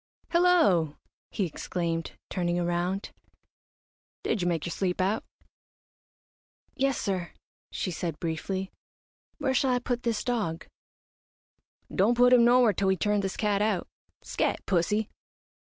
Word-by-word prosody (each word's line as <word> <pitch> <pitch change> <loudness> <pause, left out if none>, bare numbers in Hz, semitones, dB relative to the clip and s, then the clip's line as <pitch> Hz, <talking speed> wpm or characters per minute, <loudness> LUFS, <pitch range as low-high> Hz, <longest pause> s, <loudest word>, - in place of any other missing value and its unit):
"Hello!" 330 - +4 0.3
he 200 - -1
exclaimed, 165 0 -3 0.2
turning 175 -1 0
around, 175 +3 -1 1.1
"did 220 - 0
you 175 - 0
make 165 -3 0
your 170 - -3
sleep 180 0 -1
out?" 195 +4 +1 1.5
"Yes 275 -1 0
sir," 185 -4 -2 0.4
she 185 - -3
said, 165 -2 -4
briefly. 185 +4 -3 0.7
"Where 265 - 0
shall 265 +1 +2
I 250 - +3
put 245 0 -2
this 230 -3 -1
dog?" 210 -10 -2 1.3
"Don't 220 +5 +3
put 250 +1 +6
him 245 -2 +7
nowhere 240 -2 +5
till 195 +2 0
we 190 0 +3
turn 210 +3 +1
this 195 -1 -3
cat 205 -2 +1
out. 210 -4 0 0.4
Scat, - - -1
pussy!" 205 +4 +1
195 Hz, 130 wpm, -28 LUFS, 175-235 Hz, 1.5 s, him